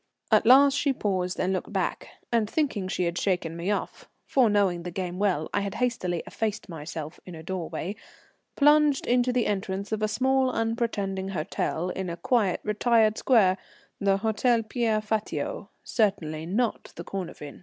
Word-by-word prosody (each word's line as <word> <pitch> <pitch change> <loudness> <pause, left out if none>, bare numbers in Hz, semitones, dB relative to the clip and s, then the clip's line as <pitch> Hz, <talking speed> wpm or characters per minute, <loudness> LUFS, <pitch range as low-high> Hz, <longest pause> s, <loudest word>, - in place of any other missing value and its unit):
At 215 0 +4
last 275 +2 +7
she 285 -1 +1
paused 185 -6 -2
and 185 +1 +1
looked 185 - -3
back, - - -2 0.2
and 225 -3 +2
thinking 250 -11 -1
she 185 - -1
had 170 0 -1
shaken 175 -4 -1
me 170 +3 -3
off 205 - -3 0.2
(for 255 -4 +3
knowing 195 -4 +2
the 180 - -5
game 180 0 -4
well 185 -7 +1
I 205 - +1
had 200 0 -4
hastily 225 -9 -1
effaced 220 -2 -3
myself 160 -1 -7
in 180 - -9
a 160 - -9
doorway) 185 +2 -4 0.6
plunged 295 -1 +4
into 245 +1 +2
the 245 -2 +1
entrance 195 0 -2
of 215 -1 -1
a 215 - +2
small 260 +4 +2
unpretending 225 -5 -1
hotel 175 -1 -2
in 190 -1 -4
a 170 - -5
quiet, 205 0 +1
retired 215 0 +2
square 195 -7 +4 0.4
the 195 -1 +2
Hôtel 225 +2 +1
Pierre 220 -2 0
Fatio, 220 - -3
certainly 160 - 0
not 225 +5 -1
the - - -7
Cornavin. 175 -6 -7
205 Hz, 165 wpm, -27 LUFS, 180-235 Hz, 0.6 s, last